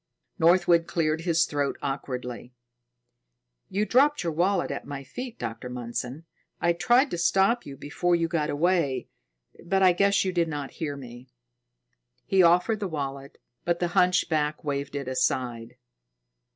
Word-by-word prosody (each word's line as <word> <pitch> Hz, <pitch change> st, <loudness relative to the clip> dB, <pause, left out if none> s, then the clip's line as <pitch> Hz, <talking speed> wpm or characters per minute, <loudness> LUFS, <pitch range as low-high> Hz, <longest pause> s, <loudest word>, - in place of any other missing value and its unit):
Northwood 170 Hz, 0 st, +4 dB
cleared 160 Hz, -1 st, 0 dB
his 165 Hz, -1 st, +2 dB
throat 145 Hz, -2 st, -2 dB
awkwardly. 125 Hz, -3 st, -5 dB, 1.1 s
"You 205 Hz, +3 st, 0 dB
dropped 285 Hz, +4 st, +3 dB
your 165 Hz, -2 st, -2 dB
wallet 180 Hz, +3 st, +1 dB
at -, -, -4 dB
my 140 Hz, -1 st, -6 dB
feet, 245 Hz, -, -7 dB
Dr. 115 Hz, +1 st, -6 dB
Mundson. 125 Hz, +4 st, -5 dB, 0.4 s
I 170 Hz, -, +2 dB
tried 245 Hz, +10 st, +3 dB
to 175 Hz, -, -3 dB
stop 195 Hz, +7 st, +2 dB
you 135 Hz, -1 st, -8 dB
before 175 Hz, +6 st, 0 dB
you 165 Hz, -1 st, 0 dB
got 160 Hz, -3 st, -1 dB
away, 155 Hz, -3 st, 0 dB, 0.5 s
but 190 Hz, +2 st, +1 dB
I 185 Hz, -1 st, +6 dB
guess 200 Hz, +2 st, +2 dB
you 185 Hz, -, 0 dB
did 170 Hz, -2 st, +1 dB
not 145 Hz, -3 st, -5 dB
hear 145 Hz, -3 st, -2 dB
me." 125 Hz, -1 st, -11 dB, 1.0 s
He 190 Hz, -1 st, +3 dB
offered 180 Hz, +5 st, +4 dB
the 200 Hz, -, -2 dB
wallet, 140 Hz, -4 st, -5 dB, 0.3 s
but 175 Hz, 0 st, 0 dB
the 175 Hz, 0 st, -1 dB
hunchback 160 Hz, -4 st, +1 dB
waved 140 Hz, -1 st, -3 dB
it 140 Hz, -2 st, -4 dB
aside. 125 Hz, -3 st, -1 dB
165 Hz, 150 wpm, -26 LUFS, 140-180 Hz, 1.1 s, I